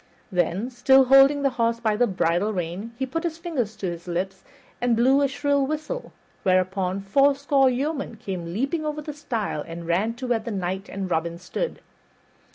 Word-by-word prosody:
Then, 180 Hz, +6 st, 0 dB
still 265 Hz, +2 st, +5 dB
holding 270 Hz, +2 st, +6 dB
the 275 Hz, -, +3 dB
horse 230 Hz, 0 st, +2 dB
by 220 Hz, -2 st, +1 dB
the 245 Hz, +3 st, +3 dB
bridle 185 Hz, +1 st, +1 dB
rein, 185 Hz, +4 st, -4 dB
he 265 Hz, -, -1 dB
put 330 Hz, +6 st, -3 dB
his 330 Hz, -2 st, -2 dB
fingers 275 Hz, -, -3 dB
to 200 Hz, -, -6 dB
his 170 Hz, -1 st, -5 dB
lips 185 Hz, +2 st, -3 dB, 0.4 s
and 245 Hz, -1 st, +3 dB
blew 260 Hz, +5 st, +4 dB
a 280 Hz, -, +4 dB
shrill 280 Hz, 0 st, +1 dB
whistle, 310 Hz, -, -4 dB, 0.3 s
whereupon 185 Hz, +1 st, +1 dB
fourscore 275 Hz, +5 st, +3 dB
yeomen 275 Hz, 0 st, -2 dB
came 185 Hz, -6 st, -5 dB
leaping 275 Hz, -, -1 dB
over 300 Hz, 0 st, -3 dB
the 300 Hz, -, -6 dB
stile 230 Hz, -, -3 dB
and 170 Hz, 0 st, -7 dB
ran 195 Hz, +7 st, 0 dB
to 255 Hz, -, -6 dB
where 240 Hz, -2 st, +1 dB
the 220 Hz, -, -7 dB
Knight 190 Hz, -1 st, -3 dB
and 195 Hz, -2 st, -4 dB
Robin 170 Hz, +1 st, -1 dB
stood. 185 Hz, -, -4 dB
230 Hz, 180 wpm, -24 LUFS, 185-275 Hz, 0.4 s, holding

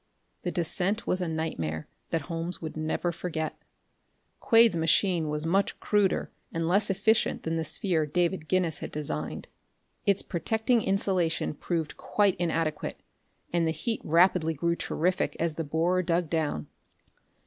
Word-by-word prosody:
The 180 Hz, -, -2 dB
descent 180 Hz, +5 st, +1 dB
was 185 Hz, -, +1 dB
a 180 Hz, -, -1 dB
nightmare 85 Hz, -, -3 dB, 0.2 s
that 165 Hz, -, 0 dB
Holmes 165 Hz, +3 st, -4 dB
would 160 Hz, -2 st, -6 dB
never 155 Hz, +2 st, -1 dB
forget. 160 Hz, -2 st, -3 dB, 0.8 s
Quade's 230 Hz, -4 st, +5 dB
machine 165 Hz, 0 st, +2 dB
was 150 Hz, +1 st, 0 dB
much 195 Hz, +4 st, +1 dB
cruder 205 Hz, -3 st, +1 dB, 0.2 s
and 165 Hz, 0 st, -1 dB
less 200 Hz, +4 st, +4 dB
efficient 210 Hz, +3 st, +2 dB
than 165 Hz, 0 st, -1 dB
the 165 Hz, -, 0 dB
sphere 160 Hz, 0 st, 0 dB
David 170 Hz, +1 st, 0 dB
Guinness 180 Hz, -3 st, +1 dB
had -, -, -6 dB
designed. 80 Hz, -, -4 dB, 0.6 s
Its 200 Hz, -1 st, +3 dB
protecting 220 Hz, -, +1 dB
insulation 185 Hz, -6 st, 0 dB
proved 160 Hz, 0 st, -3 dB
quite 205 Hz, -2 st, +2 dB
inadequate, 165 Hz, -3 st, -1 dB, 0.5 s
and 170 Hz, -1 st, +2 dB
the -, -, +2 dB
heat 190 Hz, +9 st, -2 dB
rapidly 165 Hz, 0 st, +3 dB
grew 170 Hz, +4 st, 0 dB
terrific 180 Hz, +2 st, -1 dB
as 165 Hz, -1 st, 0 dB
the 165 Hz, -, -3 dB
borer 165 Hz, +5 st, +1 dB
dug 170 Hz, -2 st, 0 dB
down. 155 Hz, -, -1 dB
170 Hz, 145 wpm, -28 LUFS, 160-185 Hz, 0.8 s, Quade's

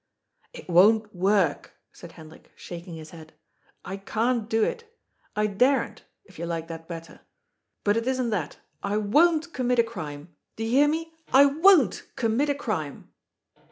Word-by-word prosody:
" -, -, -49 dB
It -, -, -11 dB
won't 210 Hz, +4 st, +4 dB
worTc^'* 185 Hz, -4 st, +1 dB, 0.3 s
said 170 Hz, -2 st, -12 dB
Hendrik, 160 Hz, -1 st, -15 dB
shaking 175 Hz, 0 st, -9 dB
his 155 Hz, -1 st, -10 dB
head. 160 Hz, -2 st, -13 dB, 0.3 s
" -, -, -32 dB
I 190 Hz, +2 st, -5 dB
can't 225 Hz, +3 st, -1 dB
do 225 Hz, -1 st, +2 dB
it. 460 Hz, -, -3 dB, 0.4 s
I 210 Hz, 0 st, +1 dB
daren't, 250 Hz, +7 st, +1 dB, 0.2 s
if -, -, -17 dB
you 170 Hz, -, -4 dB
like 165 Hz, -1 st, -4 dB
that 165 Hz, 0 st, -8 dB
better. 165 Hz, -1 st, -9 dB, 0.6 s
But 205 Hz, +1 st, +2 dB
it 230 Hz, +2 st, -2 dB
isn't 255 Hz, -3 st, 0 dB
that. 175 Hz, -9 st, -3 dB, 0.2 s
I 200 Hz, +1 st, -2 dB
worCt 315 Hz, +10 st, +2 dB
commit 250 Hz, -1 st, 0 dB
a 235 Hz, -, +5 dB
crime. 155 Hz, -8 st, -8 dB, 0.2 s
Do 225 Hz, -, -5 dB
you 225 Hz, -, -2 dB
hear 280 Hz, +4 st, +5 dB
me? 325 Hz, +2 st, -2 dB, 0.2 s
I 270 Hz, +2 st, +8 dB
worCt 300 Hz, -, +3 dB
commit 255 Hz, +3 st, 0 dB
a 285 Hz, -, +1 dB
crime." 185 Hz, -, -5 dB
215 Hz, 170 wpm, -26 LUFS, 170-260 Hz, 0.6 s, I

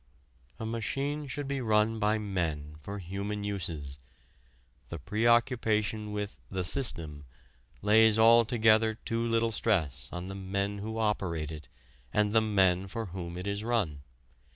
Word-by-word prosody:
A 110 Hz, -, -4 dB
machine 135 Hz, +6 st, -2 dB
should 140 Hz, +1 st, -4 dB
be 140 Hz, -1 st, -2 dB
run 110 Hz, -1 st, +2 dB
by 105 Hz, 0 st, +2 dB
men 80 Hz, -8 st, -3 dB
for 100 Hz, +6 st, -6 dB
human 100 Hz, +3 st, -4 dB
uses. 80 Hz, -9 st, -4 dB, 0.9 s
The 85 Hz, -, -5 dB
preoccupation 110 Hz, -, +1 dB
with 105 Hz, 0 st, -4 dB
the 95 Hz, -1 st, -2 dB
"system" 85 Hz, -, 0 dB, 0.6 s
lays 110 Hz, +1 st, +5 dB
altogether 110 Hz, -1 st, +5 dB
too 115 Hz, +1 st, -3 dB
little 115 Hz, 0 st, +1 dB
stress 80 Hz, -, 0 dB
on 90 Hz, +1 st, -5 dB
the 95 Hz, -, -6 dB
men 100 Hz, +1 st, -2 dB
who 110 Hz, +2 st, -5 dB
operate 90 Hz, -8 st, -1 dB
it 75 Hz, -1 st, -9 dB, 0.4 s
and 105 Hz, 0 st, +1 dB
the 110 Hz, -, +5 dB
men 95 Hz, -3 st, +2 dB
for 115 Hz, +3 st, -4 dB
whom 85 Hz, -2 st, -6 dB
it 90 Hz, -, -5 dB
is 100 Hz, +1 st, -2 dB
run. 105 Hz, -12 st, -1 dB
105 Hz, 140 wpm, -30 LUFS, 90-115 Hz, 0.9 s, lays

